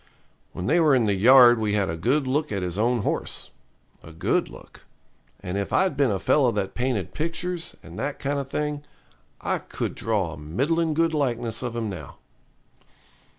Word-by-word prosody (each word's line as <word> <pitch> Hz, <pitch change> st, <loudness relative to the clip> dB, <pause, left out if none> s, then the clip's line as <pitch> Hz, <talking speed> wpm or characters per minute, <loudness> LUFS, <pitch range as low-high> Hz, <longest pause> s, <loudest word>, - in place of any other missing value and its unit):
When 90 Hz, -, -6 dB
they 160 Hz, -, +3 dB
were 155 Hz, -4 st, +5 dB
in 120 Hz, -3 st, +2 dB
the 105 Hz, -, +2 dB
yard 120 Hz, +3 st, +7 dB
we 105 Hz, -2 st, 0 dB
had 100 Hz, -2 st, +1 dB
a 80 Hz, -, -2 dB
good 130 Hz, -, +1 dB
look 150 Hz, +4 st, -1 dB
at 100 Hz, -3 st, -2 dB
his 90 Hz, -1 st, -3 dB
own 120 Hz, 0 st, +1 dB
horse -, -, -3 dB, 0.5 s
a 80 Hz, -, -12 dB
good 80 Hz, -, 0 dB
look -, -, -14 dB, 0.6 s
and 90 Hz, +2 st, -3 dB
if 100 Hz, -, -4 dB
I'd 190 Hz, -6 st, +2 dB
been 140 Hz, -2 st, +2 dB
a 100 Hz, -, 0 dB
fellow 130 Hz, +5 st, +3 dB
that 100 Hz, -2 st, -2 dB
painted 120 Hz, -7 st, -2 dB
pictures, 170 Hz, +2 st, -3 dB
and 85 Hz, +1 st, -10 dB
that 140 Hz, +1 st, -3 dB
kind 140 Hz, +1 st, -2 dB
of 135 Hz, -1 st, -5 dB
thing, 150 Hz, 0 st, -2 dB, 0.6 s
I -, -, -1 dB
could -, -, -4 dB
draw 100 Hz, -7 st, -1 dB
a -, -, -10 dB
middlin' 150 Hz, -, 0 dB
good 165 Hz, 0 st, +2 dB
likeness 120 Hz, -6 st, -1 dB
of 120 Hz, -2 st, -4 dB
him 115 Hz, -2 st, -2 dB
now. 80 Hz, -9 st, -8 dB
120 Hz, 190 wpm, -25 LUFS, 100-145 Hz, 0.6 s, yard